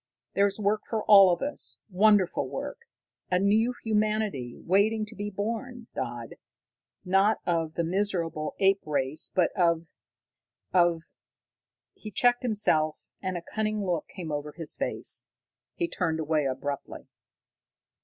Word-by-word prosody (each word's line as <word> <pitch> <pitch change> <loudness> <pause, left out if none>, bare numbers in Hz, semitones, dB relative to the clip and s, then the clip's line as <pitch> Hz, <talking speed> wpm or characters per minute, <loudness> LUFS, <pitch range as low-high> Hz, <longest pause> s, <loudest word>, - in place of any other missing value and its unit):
There's 200 +1 +2
work 210 +1 +1
for 220 -2 -1
all 195 -3 +8
of 175 - -1
us, 290 +1 0
wonderful 205 -1 +3
work. 470 - -6 0.4
A 180 - +3
new 215 +6 +2
humanity, 215 - 0
waiting 215 +4 +2
to 210 - -10
be 205 0 -4
born, 230 +4 -4
Dodd, 120 -1 -5 0.7
not 195 +4 +3
of 165 -2 0
the 170 - 0
miserable 170 -4 -1
ape 195 0 +3
race, 145 0 -1
but 180 -3 +2
of 170 -3 +2 0.9
of 175 -2 +3 0.5
" - - -66
He 215 - -6
checked 245 +4 +2
himself, 185 -10 +1 0.2
and 185 -2 -2
a 170 - -7
cunning 215 +1 -2
look 175 -4 -1
came 175 -5 -7
over 145 0 -4
his 165 -2 -4
face. - - -3 0.5
He 345 - -1
turned 160 - -1
away 155 -1 +1
abruptly. 135 +1 -4
190 Hz, 135 wpm, -28 LUFS, 165-215 Hz, 0.9 s, all